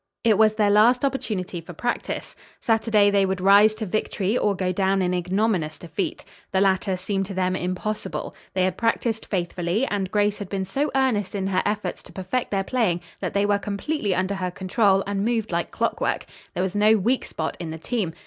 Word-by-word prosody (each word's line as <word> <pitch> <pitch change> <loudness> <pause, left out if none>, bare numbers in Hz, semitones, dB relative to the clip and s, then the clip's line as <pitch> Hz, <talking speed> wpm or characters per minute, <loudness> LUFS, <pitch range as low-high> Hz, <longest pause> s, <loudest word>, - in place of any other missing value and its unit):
It 220 -3 +4
was 215 -1 +5
their 210 -2 +3
last 240 +6 +5
opportunity 200 -10 -3
for 175 +2 -10
practice. 240 +9 -3 0.2
Saturday 220 -2 +3
they 200 -1 +3
would 190 -1 0
rise 200 +3 +6
to 220 0 -4
victory 205 +1 -1
or 210 -5 +1
go 185 0 -1
down 195 +1 +1
in 180 -1 +1
ignominious 180 -3 0
defeat. 170 +3 -4 0.3
The 190 - +2
latter 190 -1 +2
seemed 195 +1 -2
to 195 - -6
them 185 0 +1
impossible. 185 +4 -3 0.2
They 185 - +2
had 185 -1 -1
practised 230 -1 0
faithfully, 180 +4 -1
and 200 -6 -2
Grace 205 +1 +1
had 200 -3 -6
been 195 -1 -2
so 275 +10 -1
earnest 225 -8 +1
in 195 -1 -1
her 185 -1 +1
efforts 210 0 -2
to - - -15
perfect 190 +7 -2
their 195 -1 0
playing 195 -7 0 0.2
that - - -4
they 200 0 +3
were 205 0 +2
completely 205 - -2
under 185 +2 0
her 185 -2 -2
control 195 +2 +2
and 200 0 -1
moved 225 -2 0
like 170 0 -1
clockwork. - - -1 0.3
There 180 - 0
was 190 -1 -2
no 215 +2 +5
weak 235 +6 +1
spot 160 0 -4
in 170 -2 -5
the 160 - -5
team. 185 0 -2
200 Hz, 200 wpm, -24 LUFS, 185-215 Hz, 0.3 s, rise